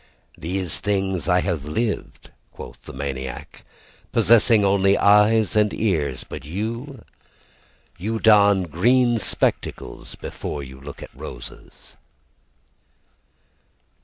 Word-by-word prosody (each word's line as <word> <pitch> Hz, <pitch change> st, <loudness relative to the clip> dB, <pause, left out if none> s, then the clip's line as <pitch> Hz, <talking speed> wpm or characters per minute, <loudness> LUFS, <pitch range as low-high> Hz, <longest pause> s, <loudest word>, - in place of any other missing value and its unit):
"These 90 Hz, +1 st, -2 dB
things 95 Hz, -4 st, -1 dB
have 90 Hz, 0 st, +2 dB, 0.2 s
I -, -, -5 dB
lived," 110 Hz, +6 st, -3 dB, 0.2 s
quoth -, -, -11 dB
the -, -, -8 dB
maniac, 65 Hz, -1 st, -6 dB, 0.5 s
"Possessing 115 Hz, -2 st, +4 dB
only 100 Hz, 0 st, +3 dB
eyes 105 Hz, +1 st, +4 dB
and 105 Hz, -1 st, +3 dB
ears. 75 Hz, -, -1 dB
"But 75 Hz, -, -8 dB
you 115 Hz, -, -5 dB, 0.9 s
"You 110 Hz, +5 st, -2 dB
don 100 Hz, -3 st, +5 dB
green 120 Hz, -, +2 dB
spectacles -, -, -2 dB
before 70 Hz, -, -6 dB
you 65 Hz, 0 st, -11 dB
look 70 Hz, +1 st, -9 dB
at -, -, -11 dB
roses." -, -, -11 dB
100 Hz, 105 wpm, -22 LUFS, 75-110 Hz, 0.9 s, don